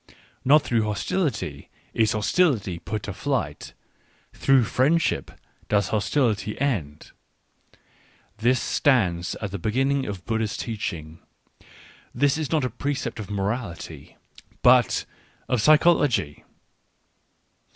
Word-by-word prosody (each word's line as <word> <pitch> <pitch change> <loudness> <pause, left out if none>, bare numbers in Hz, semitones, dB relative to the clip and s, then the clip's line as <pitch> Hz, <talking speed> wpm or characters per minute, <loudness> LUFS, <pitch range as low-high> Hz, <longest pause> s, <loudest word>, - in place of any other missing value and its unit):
" - - -35
Not 150 0 +7
through 115 -2 +1
hostility 115 - -2 0.2
is 110 -1 +2
hostility 110 - +1
put 105 +2 -5
to 105 - -5
flight; 95 - -3 0.6
through 135 -2 +3
friendship 145 +9 +1 0.4
does 100 -2 +2
hostility 110 0 0
end": 95 - -2 1.3
this 125 +3 +3
stands 95 - +1
at 100 -3 -5
the 100 - -4
beginning 135 +7 0
of 95 -3 -6
Buddha's 110 -2 -1
teaching 85 -8 -5 0.5
— - - -23
this 140 +3 +2
is 155 - -3
not 155 -5 +2
a - - -1
precept 135 -2 -3
of 105 - -7
morality, 100 -1 -4 0.5
but - - +4 0.4
of 125 -4 +1
physiology. 150 - +3
115 Hz, 110 wpm, -24 LUFS, 100-140 Hz, 1.3 s, Not